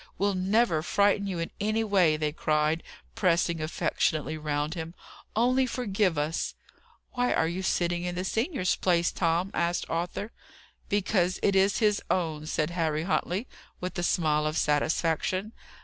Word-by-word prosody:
We'll 200 +1 +1
never 190 -2 +2
frighten 200 +3 +2
you 185 -3 -3
in 165 0 -3
any 215 +2 +1
way!" 185 -7 +3
they 155 -1 -1
cried, 155 +1 +1 0.3
pressing 170 -3 +1
affectionately 155 -1 -1
round 150 0 -2
him. 165 0 -6 0.4
"Only 255 +3 +3
forgive 205 - 0
us!" 150 +2 -1 0.6
"Why 245 0 0
are 160 - +2
you 175 +3 -3
sitting 175 -1 0
in 180 0 -3
the 180 - -2
senior's 225 - 0
place, 170 -2 +2
Tom?" 170 +2 0
asked 170 0 0
Arthur. 175 +6 -3 0.6
"Because 190 -3 +1
it 200 - +3
is 195 +1 +3
his 210 -3 +2
own," 155 -4 -1
said 155 +1 -1
Harry 160 -3 0
Huntley, 190 +4 -1 0.3
with 180 0 -4
a 175 - -2
smile 155 -3 +1
of 155 - -2
satisfaction. 165 +6 0
175 Hz, 150 wpm, -28 LUFS, 160-200 Hz, 0.6 s, way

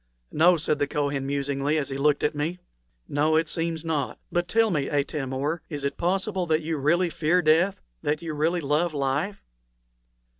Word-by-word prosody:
"No," 170 +3 +5
said 150 -1 0
the 145 - +1
Kohen, 140 -2 -1
musingly, 140 +1 0
as 145 -3 -1
he 135 - -4
looked 145 0 +2
at 150 - +2
me. 155 +4 -2 0.5
"No, 150 +2 +2
it 160 0 +2
seems 165 0 -2
not; 150 -5 -1
but 175 0 0
tell 225 +1 +3
me, 145 -5 0
Atam 145 -2 -1
or, 145 +5 -2
is 145 -3 -5
it 140 0 -1
possible 185 +1 -1
that 160 0 +1
you 160 0 -2
really 170 +5 +2
fear 160 +4 +2
death 165 +5 +3 0.2
that 150 +3 -1
you 165 -2 -4
really 165 +4 +1
love 150 +3 0
life?" 145 +9 -1
155 Hz, 185 wpm, -26 LUFS, 145-170 Hz, 0.5 s, No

